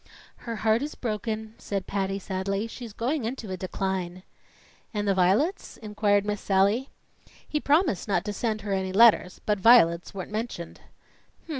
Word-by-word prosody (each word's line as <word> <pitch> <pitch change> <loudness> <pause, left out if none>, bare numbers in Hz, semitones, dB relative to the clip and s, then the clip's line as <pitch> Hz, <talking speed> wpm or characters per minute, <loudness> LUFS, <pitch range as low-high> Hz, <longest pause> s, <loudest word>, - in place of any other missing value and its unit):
"Her 230 - -2
heart 220 +1 +2
is 295 +2 -4
broken," 220 -1 -4
said 195 -2 -3
Patty 195 -1 -2
sadly. 195 +1 -3
"She's 230 0 -8
going 250 +6 -2
into 225 -3 -5
a - - -2
decline." 185 -1 -3 0.7
"And 205 0 -1
the 200 - +3
violets?" 200 - +1
inquired 210 -2 +1
Miss 205 -1 -2
Sallie. 200 +7 +2 0.6
"He 300 - -1
promised 295 - +1
not 195 -2 0
to 210 - -3
send 215 +1 -2
her 200 -1 -3
any 190 -1 -1
letters, 210 -4 +5
but 210 -1 +1
violets 185 -6 +5
weren't 195 0 -7
mentioned." 215 -6 -5
210 Hz, 155 wpm, -26 LUFS, 190-230 Hz, 0.7 s, letters